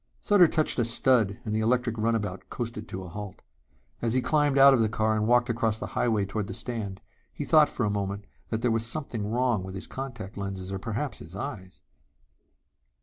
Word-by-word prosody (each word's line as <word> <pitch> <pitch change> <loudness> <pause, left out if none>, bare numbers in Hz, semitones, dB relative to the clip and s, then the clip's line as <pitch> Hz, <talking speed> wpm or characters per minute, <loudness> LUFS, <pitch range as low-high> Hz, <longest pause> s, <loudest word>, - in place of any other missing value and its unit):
Sutter 200 -4 +5
touched 155 -4 +1
a - - +4
stud 115 -3 +2
and 105 - -2
the 110 - +1
electric 120 +1 +1
runabout 110 -4 -1
coasted 115 -2 -5
to 95 +1 -6
a - - -8
halt. 100 +2 -8 0.6
As 115 0 0
he - - +4
climbed 145 0 +2
out 135 0 +9
of 130 - +3
the 110 -1 +2
car 110 -1 +1
and 105 0 0
walked 120 +1 +4
across 115 -2 0
the - - -5
highway 110 -4 +1
toward 100 +1 -3
the - - -5
stand, 105 -5 -4 0.3
he - - -5
thought 155 -1 +5
for 120 - -2
a 105 - 0
moment 100 0 -3 0.2
there 115 +1 0
was 115 0 +1
something 115 -4 -3
wrong 120 -2 +1
with 95 0 -7
his 95 - -5
contact 120 -7 -7
lenses 95 -1 -5
or 95 - -3
perhaps 115 +7 -3
his 80 +4 -11
eyes. 100 -6 -7
110 Hz, 205 wpm, -27 LUFS, 100-125 Hz, 0.6 s, out